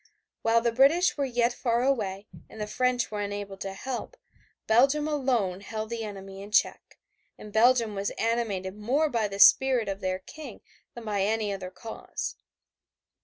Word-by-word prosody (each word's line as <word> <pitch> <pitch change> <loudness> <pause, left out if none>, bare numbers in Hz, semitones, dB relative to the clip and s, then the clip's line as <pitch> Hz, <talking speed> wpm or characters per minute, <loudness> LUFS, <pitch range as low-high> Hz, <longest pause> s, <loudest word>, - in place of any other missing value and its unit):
While 230 0 +3
the 235 0 +1
British 280 +9 +4
were 280 - 0
yet 240 -1 +1
far 240 -1 0
away 210 -7 -1 0.2
and 220 - -12
the 210 - -2
French 250 +2 0
were 210 -1 -3
unable 205 -1 -4
to 195 0 -5
help, 265 - -5 0.5
Belgium 275 +7 +3
alone 245 -11 0
held 215 +1 -5
the 230 -1 -3
enemy 195 -2 -8
in 200 - -9
check, 220 - +1 0.4
and 210 -1 -11
Belgium 230 0 +4
was 200 0 -2
animated 215 -5 -1
more 265 +9 +1
by 230 -5 0
the 195 0 -7
spirit 255 +1 +6
of 195 0 -3
their 185 -1 -1
King 265 +5 -11 0.3
than 235 -1 -9
by 205 -2 -1
any 210 0 0
other 185 -2 -6
cause. 220 +4 -6
225 Hz, 170 wpm, -27 LUFS, 200-250 Hz, 0.5 s, spirit